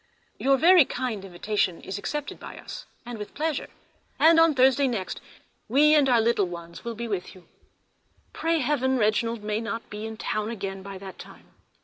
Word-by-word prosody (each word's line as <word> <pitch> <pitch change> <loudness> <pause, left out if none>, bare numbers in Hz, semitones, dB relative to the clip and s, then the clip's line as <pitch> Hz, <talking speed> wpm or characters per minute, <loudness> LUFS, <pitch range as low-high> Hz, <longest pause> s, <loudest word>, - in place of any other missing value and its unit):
Your 275 0 +3 0.3
kind 245 -7 -3
invitation 190 -1 -1
is 195 +1 -5
accepted 295 +7 -4
by - - -9
us - - -9 0.2
with 225 -4 -7
pleasure, 310 -1 -2 0.5
and 325 +1 +6
on 330 -2 +5
Thursday 265 +1 +4
next 220 -7 -3 0.5
we 295 +5 +5
and 290 -3 +5
our 240 -2 +5
little 225 -4 +2
ones 170 -1 -9
will 235 -1 -4
be 235 +2 -4
with 195 -4 -4
you. 185 - -17 0.9
Pray 330 0 0
heaven, 260 -1 +1
Reginald 225 0 +1
may 210 +1 -1
not 230 0 -5
be 210 +1 -5
in 220 0 -8
town 215 0 -2
again 195 -4 -5
by 195 0 -8
that 190 0 -10
time! - - -13
230 Hz, 170 wpm, -26 LUFS, 200-265 Hz, 0.9 s, and